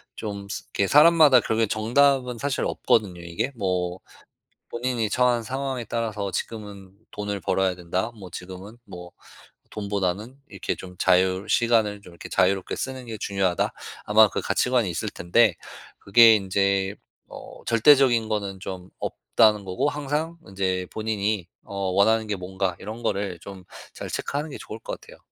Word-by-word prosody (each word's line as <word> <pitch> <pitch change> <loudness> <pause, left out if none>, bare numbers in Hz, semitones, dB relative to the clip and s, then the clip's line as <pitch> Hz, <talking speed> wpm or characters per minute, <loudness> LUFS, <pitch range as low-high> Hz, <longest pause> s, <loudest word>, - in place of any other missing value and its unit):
좀 100 -2 -6
스 - - -5
이렇게 100 - +1
사람마다 150 -3 +7
결국은 110 0 0
정답은 125 +2 +2
사실 140 +2 -2
없거든요 95 -6 0
이게. 95 +10 -3
뭐 90 -3 -2 0.7
본인이 120 -2 -2
처한 125 -1 +2
상황에 130 0 -3
따라서 105 -3 -3
'지금은 100 -3 -6 0.2
돈을 105 -1 -4
벌어야 95 -1 0
된다.' 90 +6 -3
뭐 95 -3 -10
'지금은 95 +5 -9
뭐 90 0 -10 0.6
돈보다는 100 +4 -3
이렇게 95 -3 -3
좀 90 -1 -11
자유 95 +1 +3
시간을 110 -4 +2
좀 90 -3 -14
이렇게 85 - -10
자유롭게 95 0 +1
쓰는 130 -1 -5
게 110 -1 -6
중요하다.' 95 -3 0 0.3
아마 110 +1 +6
그 - - -3
가치관이 120 +1 +1
있을 85 - -3
텐데 95 +3 +2 0.4
그게 115 +2 +7
인제 100 0 0 0.3
어 - - -11
절대적인 120 -1 +4
거는 100 -3 -3
좀 95 -1 -7
없다는 105 -3 +2
거고 95 +10 0
항상 150 +3 -3
인제 95 -2 -2
본인이 105 -4 -2 0.2
어 100 - -10 0.2
원하는 110 +3 +3
게 105 - -1
뭔가 95 0 -3
이런 110 +4 -7
거를 100 -3 -2
좀 95 +1 -10 0.3
잘 - - -7
체크하는 145 +2 -3
게 - - -7
좋을 110 - -8
것 - - -6
같아요. - - -15
105 Hz, 325 characters per minute, -24 LUFS, 95-120 Hz, 0.7 s, 사람마다